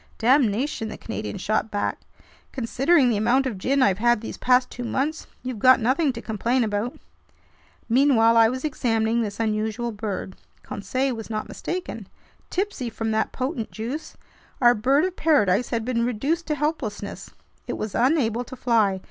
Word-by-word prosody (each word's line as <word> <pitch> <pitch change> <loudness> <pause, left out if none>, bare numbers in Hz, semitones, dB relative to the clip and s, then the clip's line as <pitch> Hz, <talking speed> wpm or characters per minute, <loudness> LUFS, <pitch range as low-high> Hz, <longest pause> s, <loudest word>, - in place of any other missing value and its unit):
"Damnation!" 240 0 +2
the - - -7
Canadian 215 -2 -5
shot 215 +3 -1
back. 205 -1 -2 0.5
"Considering 265 +3 +2
the 215 - +1
amount 240 +6 +2
of 225 -8 -3
gin 270 +6 +2
I've 195 -3 +2
had 240 0 +3
these 225 - -6
past 250 0 +2
two 245 - -6
months, 280 +6 -2 0.2
you've 250 -4 -4
got 255 +4 +6
nothing 265 +6 +2
to 230 - -8
complain 235 +3 0
about!" 215 +3 -2 0.9
Meanwhile 230 -2 +4
I 225 -1 +6
was 255 +4 -4
examining 230 -5 0
this 210 -2 -4
unusual 220 +1 -1
bird. 205 -3 -5 0.3
Conseil 260 +6 -2
was 225 -1 -8
not 215 -1 -3
mistaken. 335 - -5 0.4
Tipsy 380 - -2
from 225 0 -3
that 220 0 0
potent 255 -3 -3
juice, 245 +8 -6 0.4
our 240 -1 +6
bird 270 +8 +2
of 370 -1 -3
paradise 245 - +2
had 230 -2 -2
been 235 -2 0
reduced 275 +9 -1
to 305 - 0
helplessness. 270 -9 -3 0.4
It - - -2
was 215 -2 -4
unable 245 -3 +2
to 260 - -9
fly. 220 -6 +2
235 Hz, 165 wpm, -24 LUFS, 220-265 Hz, 0.9 s, got